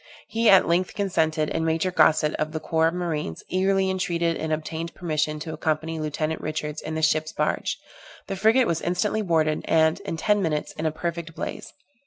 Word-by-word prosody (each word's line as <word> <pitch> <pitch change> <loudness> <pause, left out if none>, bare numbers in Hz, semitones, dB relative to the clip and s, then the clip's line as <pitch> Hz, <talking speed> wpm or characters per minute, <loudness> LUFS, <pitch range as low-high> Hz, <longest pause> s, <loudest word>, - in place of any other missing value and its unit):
He 225 0 +3
at 195 -1 +7
length 175 +2 +1
consented, 160 -6 0
and 160 - -1
Major 165 +3 +1
Gossett, 155 -3 +4
of 155 +1 -2
the 160 - -2
corps 160 +1 +1
of 165 - -1
marines, 160 - -3
eagerly 190 +1 +2
entreated 170 -3 0
and 160 - -3
obtained 160 +2 -3
permission 155 -3 -1
to 160 0 -5
accompany 160 +1 -2
Lieutenant 155 +1 -2
Richards 155 0 -4
in 160 +1 -5
the 160 - -2
ship's 155 0 +2
barge. - - -1 0.5
The 195 - -4
frigate 220 +6 +4
was 165 -4 -1
instantly 205 +5 0
boarded, 160 -5 +1
and, 160 +2 +3
in 200 -4 -5
ten 210 +4 +2
minutes, 155 -4 -1
in 160 - -3
a - - 0
perfect 170 0 -4
blaze. - - -5
160 Hz, 190 wpm, -25 LUFS, 155-180 Hz, 0.5 s, at